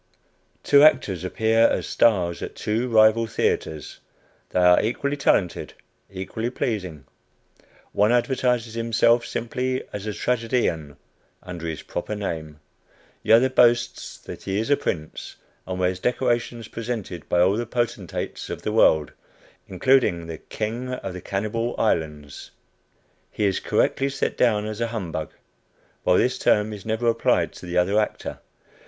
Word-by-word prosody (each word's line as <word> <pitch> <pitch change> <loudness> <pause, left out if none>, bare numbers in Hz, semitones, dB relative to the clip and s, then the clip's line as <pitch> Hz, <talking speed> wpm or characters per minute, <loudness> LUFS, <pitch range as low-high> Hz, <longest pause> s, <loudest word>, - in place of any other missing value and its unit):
Two 140 -1 +6
actors 100 - +4
appear 110 +5 +1
as - - -1
stars 90 -7 +2
at - - -6
two 115 +4 -1
rival 110 0 +5
theatres. 80 -8 -2 0.5
They - - 0
are 90 0 +6
equally 140 +6 -1
talented, 95 -10 0 0.4
equally 95 +5 -4
pleasing. 90 - -3 0.9
One 105 +3 +3
advertises 120 -2 +1
himself 115 +1 +2
simply 125 +2 -2
as 105 +1 -5
a 105 - -2
tragedian, 115 - -1 0.5
under 85 -2 -6
his 80 -2 -5
proper 105 +4 -4
name 80 -7 -5 0.6
the - - +3
other 120 +3 +6
boasts 120 -2 +2
that - - -10
he 95 0 -3
is 110 +5 -1
a - - +7
prince, 80 - -5 0.3
and 95 0 -4
wears 90 0 0
decorations 120 -1 -1
presented 110 -8 -6
by 90 - +2
all 95 +3 +4
the 120 +1 -3
potentates 120 -7 -3
of - - -6
the - - -1
world, 75 -2 +4 0.6
including 95 -3 +2
the 80 -1 -7
"King 120 +4 -4
of 95 -7 -5
the 90 - -7
Cannibal 110 +6 -2
Islands." 75 -8 -2 0.8
He 105 - -2
is 95 -2 +1
correctly 135 +1 +1
set 135 - -2
down 105 -4 +2
as 110 +1 -5
a 115 - +1
"humbug," 90 -9 -4 0.7
while - - +3
this - - +1
term 105 +1 +2
is 105 0 -9
never 110 +2 -1
applied 115 0 +2
to - - -11
the 85 - -2
other 95 +4 +3
actor. 105 - -3
110 Hz, 145 wpm, -24 LUFS, 90-120 Hz, 0.9 s, a